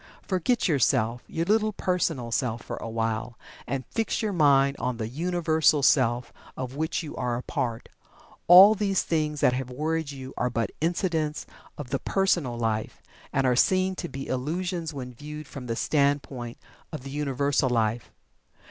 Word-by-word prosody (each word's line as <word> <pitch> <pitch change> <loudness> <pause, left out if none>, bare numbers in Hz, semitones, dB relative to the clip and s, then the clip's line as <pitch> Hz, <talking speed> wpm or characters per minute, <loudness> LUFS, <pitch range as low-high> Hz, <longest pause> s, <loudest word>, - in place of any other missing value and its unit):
Forget 195 +6 +1
yourself 120 -6 +2
your 165 +1 -2
little 215 +2 +2
personal 165 -11 -1
self 115 -1 -1
for - - -6
a 115 - -6
while, 115 +1 -2 0.3
and 135 -1 -2
fix 225 -1 -1
your 210 -2 -1
mind 140 -4 +4
on 125 -1 -2
the 110 -2 -3
Universal 160 +1 +1
Self 125 -3 +3 0.2
of 130 0 -5
which 160 +3 -2
you 150 - -7
are 120 -1 -1
a 125 - -6
part. 115 -2 -3 0.6
All 190 +4 +10
these 200 -2 0
things 155 -3 -1
that 125 - +4
have 130 0 -3
worried 155 +4 -2
you 135 -2 -8
are 125 - 0
but 115 -2 -2
incidents 165 -2 -1 0.3
of 135 -4 -7
the - - 0
Personal 175 -11 0
Life, 110 -2 -2 0.3
and 135 - +1
are 125 -1 +3
seen 185 +7 +3
to 175 - -4
be 135 0 -6
illusions 165 +5 -2
when 125 -4 -7
viewed 150 +4 -8
from 130 -3 -8
the 115 - -2
standpoint 140 -4 0 0.3
of 155 -5 -6
the 135 - -7
Universal 140 -1 0
Life. 115 -1 0
140 Hz, 165 wpm, -26 LUFS, 125-165 Hz, 0.6 s, All